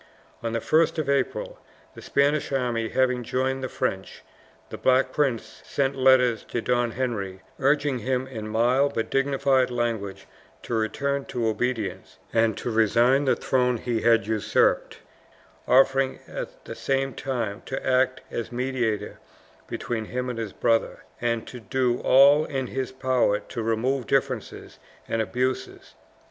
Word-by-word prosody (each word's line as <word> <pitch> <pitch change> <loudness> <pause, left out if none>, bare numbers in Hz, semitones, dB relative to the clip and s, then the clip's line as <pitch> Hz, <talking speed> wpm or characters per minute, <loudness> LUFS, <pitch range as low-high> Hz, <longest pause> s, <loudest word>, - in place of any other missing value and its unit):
On 115 -1 -3
the 115 - 0
1st 160 +6 +2
of 155 -3 -1
April, - - -1 0.3
the - - -11
Spanish 140 +2 +1
army 120 -4 -1
having 125 -1 +1
joined 130 +2 -1
the 130 - -2
French, 95 0 -3 0.5
the - - -5
Black 130 +1 +3
Prince 120 -7 -1
sent 135 -1 -1
letters 130 -4 +4
to - - -3
Don 120 0 0
Henry, 100 -7 -3 0.2
urging 140 -1 +2
him 130 +2 -1
in 115 -5 -7
mild 125 +6 +2
but 115 - -2
dignified 135 -1 +2
language 110 -5 -3 0.4
to - - -5
return 140 +6 -1
to 120 -2 -3
obedience, 110 -1 -2 0.2
and 115 -2 +2
to 120 - -3
resign 120 +5 +3
the 130 - +3
throne 125 -2 +1
he 115 -1 -2
had 115 -3 +4
usurped, 110 0 +1 0.7
offering 135 +1 +4
at - - -7
the - - -6
same 135 0 -1
time 115 -6 -3
to 135 - -4
act 130 0 +2
as 120 - -4
mediator 120 -4 -2 0.5
between 115 -2 -3
him 125 +2 -3
and 115 - -6
his 110 -3 -4
brother, 115 -1 0 0.2
and 115 -1 -1
to 125 - -8
do 120 +3 0
all 140 +3 +6
in 135 -3 -3
his 130 +1 -4
power 130 -5 +1
to 120 - -6
remove 115 +3 0
differences - - -2 0.3
and 115 - 0
abuses. 125 +5 -3
125 Hz, 150 wpm, -25 LUFS, 115-135 Hz, 0.7 s, all